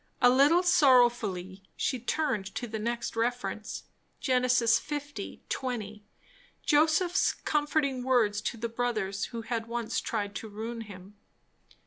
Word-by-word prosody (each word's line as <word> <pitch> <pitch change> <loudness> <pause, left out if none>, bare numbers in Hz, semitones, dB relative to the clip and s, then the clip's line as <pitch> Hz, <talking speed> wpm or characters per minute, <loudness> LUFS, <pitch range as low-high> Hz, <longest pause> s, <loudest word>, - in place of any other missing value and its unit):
A 245 -1 +6
little 290 +7 +5
sorrowfully 240 - +3 0.2
she 255 - -1
turned 245 -6 -2
to 245 - -3
the 220 -1 -5
next 235 +2 -3
reference. 225 -3 -2 0.4
Ge. - - -5
1. 255 +4 +1
20. 215 -5 -4 0.6
Joseph's 315 +4 +3
comforting 295 -3 0
words 235 -5 +2
to 235 - -3
the 230 +1 -2
brothers 220 -5 -2
who 230 -2 -6
had 230 0 -3
once 235 -1 -2
tried 205 -3 -3
to 220 - -7
ruin 225 +3 -5
him. 200 -1 -11
235 Hz, 125 wpm, -29 LUFS, 215-260 Hz, 0.6 s, A